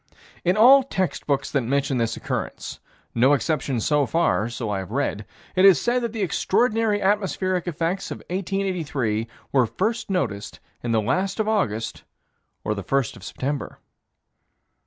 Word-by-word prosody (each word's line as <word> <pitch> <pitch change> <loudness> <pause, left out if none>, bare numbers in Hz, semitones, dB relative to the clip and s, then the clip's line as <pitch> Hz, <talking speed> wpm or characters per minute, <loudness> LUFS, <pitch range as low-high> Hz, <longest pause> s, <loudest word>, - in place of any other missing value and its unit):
In 180 +3 +2
all 260 +5 +8
text 190 -9 -2
books 140 -2 0
that 140 - +2
mention 135 +1 0
this 115 -1 -1
occurrence - - -4 0.3
no 130 +5 +4
exception 135 -1 0
so 145 +4 +2
far 140 -9 +1
so 120 -1 -4
I 100 - -1
have 95 - -6
read 115 -4 -2 0.3
it 185 - +4
is 195 -3 +8
said 245 +1 +1
that 235 -2 -2
the 220 -2 -2
extraordinary 220 +4 +1
atmospheric 190 -2 0
effects 170 +3 -2
of - - -5
1883 170 - -1 0.2
were 130 -4 +3
first 220 - -2
noticed 110 - -2 0.2
in 120 - -2
the 110 -1 +3
last 185 - 0
of 215 - +1
August 115 - -1 0.6
or 105 - 0
the 100 - -4
first 135 +3 0
of 110 - -13
September. 135 +7 -4
155 Hz, 155 wpm, -24 LUFS, 120-195 Hz, 0.6 s, all